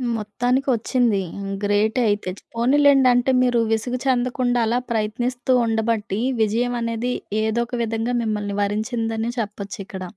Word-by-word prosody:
మొత్తానికొచ్చింది. 245 0 0 0.2
హ్మ్, 195 0 -5
గ్రేటయితే. 210 0 +1
చ్ - - -27
పోనీలెండి. 270 +3 +4
అంటే, 245 +2 +2
మీరూ 245 -2 +2
విసుగు 235 +3 0
చెందకుండా 245 -1 +1
అలా 235 +2 +1
ప్రయత్నిస్తూ 240 +4 -1
ఉండబట్టీ, 220 -2 -1 0.2
విజయవనేది 230 +2 0 0.3
ఏదో 220 +2 0
ఒక 245 - -5
విధంగా 225 +2 -2
మిమ్మల్ని 210 -2 -2
వరించిందని 225 +2 -1
చెప్పచ్చిక్కడ. 200 -3 -5
230 Hz, 110 wpm, -22 LUFS, 215-245 Hz, 0.3 s, పోనీలెండి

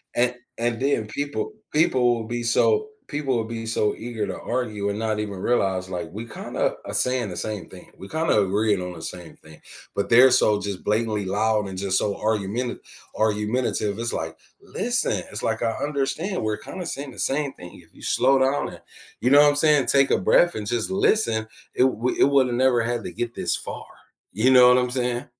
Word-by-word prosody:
And 125 +1 +2 0.2
and 115 0 -1
then 135 -6 +1
people 145 - -4 0.2
people 130 -6 +3
will 115 -1 -5
be 120 0 -3
so 430 - +2 0.2
people 145 -4 -1
will 115 - 0
be 115 0 -6
so 110 -2 0
eager 115 -3 -4
to - - -5
argue 110 -5 -2
and 100 - -3
not 110 -1 -1
even 105 -2 -4
realize, 95 -3 0
like, 90 -2 -4
we 110 +3 -6
kinda 110 - -3
are - - -6
saying 125 -4 0
the 90 - -7
same 105 -2 -4
thing, 90 - -14
we 95 - -10
kinda 160 -4 +1
agreeing 100 0 +1
on 90 0 -5
the 80 - -10
same 90 -2 -8
thing, 80 -1 -16 0.4
but 100 - -1
they're 125 +2 +7
so 105 -4 +4
just 100 -2 -5
blatantly 105 -1 0
loud 105 +1 +1
and 95 -1 -7
just 95 -1 0
so 100 -1 0
argumenta 110 +3 -2 0.4
argumentative, 105 0 0
it's, 120 0 -2
like, 80 0 -4 0.2
listen, 225 - -1
it's, 105 - -6
like 110 +1 -1
I 115 -1 +1
understand, 150 +6 -2
we're 110 0 -1
kinda 185 -2 -7
saying 140 -3 -5
the - - -13
same 140 0 0
thing, 90 - -12
if - - -26
you - - -17
slow 135 +1 +3
down 135 +2 +1
and - - -12 0.4
you 125 - +1
know 145 +1 +8
what 145 - +6
I'm 145 - +1
saying, 150 -3 +3
take 135 -1 +4
a - - +4
breath 175 - +3
and 105 -1 -4
just 115 +1 -1
listen, 190 - +1 0.3
it - - +4
would 125 -1 0
it - - +5
would 140 -2 +4
have 120 - -2
never 125 -2 +3
had 120 +1 -2
to - - -6
get 120 0 -4
this - - 0
far, - - -6 0.5
you 110 +6 +2
know 125 -1 +8
what 125 - +6
I'm 125 0 +1
saying? 125 -1 -1
115 Hz, 215 wpm, -24 LUFS, 105-130 Hz, 0.5 s, know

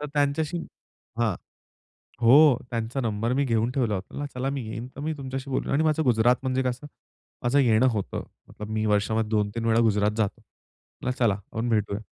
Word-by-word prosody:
तर 150 - -4
त्यांच्याशी, 145 +4 0 0.6
हां. 115 -5 +1 0.9
हो. 135 +2 +7
त्यांचा 115 +3 -3
नंबर 115 +1 -1
मी 140 +1 +1
घेऊन 115 0 +1
ठेवला 120 -6 0
होता. 100 +10 -5
'चला 130 +2 -2
मी 140 -1 -3
येईन, 120 +2 -5
तर - - -9
मी 155 +1 -2
तुमच्याशी 135 0 -5
बोलू.' 130 - -2
आणि 155 +3 +2
माझं 155 0 +2
गुजरात 120 0 +4
म्हणजे 130 0 0
कसं 130 +3 -3 0.6
माझं 130 +4 +3
येणं 120 -1 +4
होतं. 105 -3 -3 0.4
मी 110 0 -1
वर्षामध्ये 105 +1 +1
2-3 110 +1 -1
वेळा 115 0 +3
गुजरात 105 -2 +2
जातो. 105 -3 -1 0.8
चला 115 -5 +3
आपण 110 +4 -5
भेटूया. 105 -2 0
120 Hz, 170 wpm, -26 LUFS, 110-135 Hz, 0.9 s, हो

